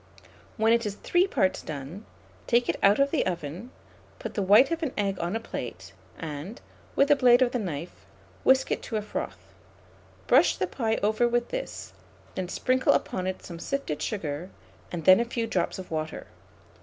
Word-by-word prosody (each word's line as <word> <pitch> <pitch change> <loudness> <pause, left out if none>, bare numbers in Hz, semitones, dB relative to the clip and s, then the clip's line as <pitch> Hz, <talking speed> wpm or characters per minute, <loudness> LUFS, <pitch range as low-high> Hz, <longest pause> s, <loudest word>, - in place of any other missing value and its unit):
When 220 +1 +4
it 235 0 +2
is 205 -3 -3
three 355 - +2
parts 190 - +1
done, 155 +8 -7 0.4
take 240 0 +3
it - - -1
out 200 +1 +5
of 275 0 +2
the 320 - +2
oven, 175 - -4 0.5
put - - -6
the 205 - -1
white 210 - +6
of 335 0 -1
an 310 -5 -2
egg 195 -2 -1
on 175 +4 -2
a - - 0
plate, 230 - -7 0.2
and, 160 - -6 0.4
with 280 - +4
the 290 - +7
blade 250 -2 +6
of 245 - 0
a 250 - 0
knife, 160 - -6 0.4
whisk 265 0 +4
it - - 0
to 225 - -6
a 210 - -2
froth; 210 - -6 0.7
brush - - +4
the - - 0
pie 225 -3 -1
over 215 +3 +3
with 240 0 0
this, - - -5 0.4
then 185 -2 -4
sprinkle 255 +6 +2
upon 185 0 -1
it 185 - -4
some 170 -2 -8
sifted 275 - -3
sugar, 170 -4 -3 0.4
and 165 -3 -5
then 185 +2 +8
a - - +3
few 235 -1 -2
drops 185 -6 -1
of 185 -2 -9
water. 155 0 -4
210 Hz, 190 wpm, -27 LUFS, 175-245 Hz, 0.7 s, then